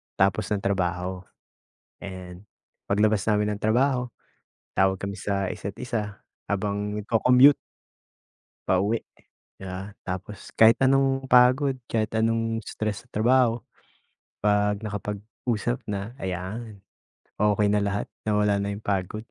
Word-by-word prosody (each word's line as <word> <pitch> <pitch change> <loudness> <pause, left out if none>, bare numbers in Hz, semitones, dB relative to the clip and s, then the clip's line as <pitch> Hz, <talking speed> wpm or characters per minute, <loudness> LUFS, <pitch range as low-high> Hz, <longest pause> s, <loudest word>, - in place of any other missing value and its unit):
tapos 95 +1 +2
ng 100 -2 -2
trabaho. 90 -1 -1 0.9
Ayan, 95 -1 -8 0.4
paglabas 105 0 +2
namin 105 -1 +1
ng - - -15
trabaho, 125 +1 +2 0.7
tawag 95 0 +3
kami 100 0 -4
sa 100 -1 -1
isa't-isa 105 0 -5 0.2
habang 105 +1 -2
nagco-commute 125 +6 +6 1.1
pauwi, 100 +5 +2 0.6
di 95 - -8
ba, 95 +2 -6 0.2
tapos 95 +3 -6
kahit 110 0 +6
anong 135 0 +2
pagod 130 +2 +5 0.2
kahit 110 -1 -1
anong 115 0 0
stress 110 0 -4
sa 125 - -28
trabaho, 120 +1 +3 0.8
pag 105 0 +2
nakapag-usap 105 +3 -3
na 105 +4 -5
ayan, 95 +4 -5 0.6
okey 105 0 +3
na 105 - +3
lahat 100 0 -1 0.2
nawala 105 -1 +2
na 100 0 -2
yung 105 - -9
pagod. 95 0 -1
105 Hz, 115 wpm, -25 LUFS, 100-115 Hz, 1.1 s, nagco-commute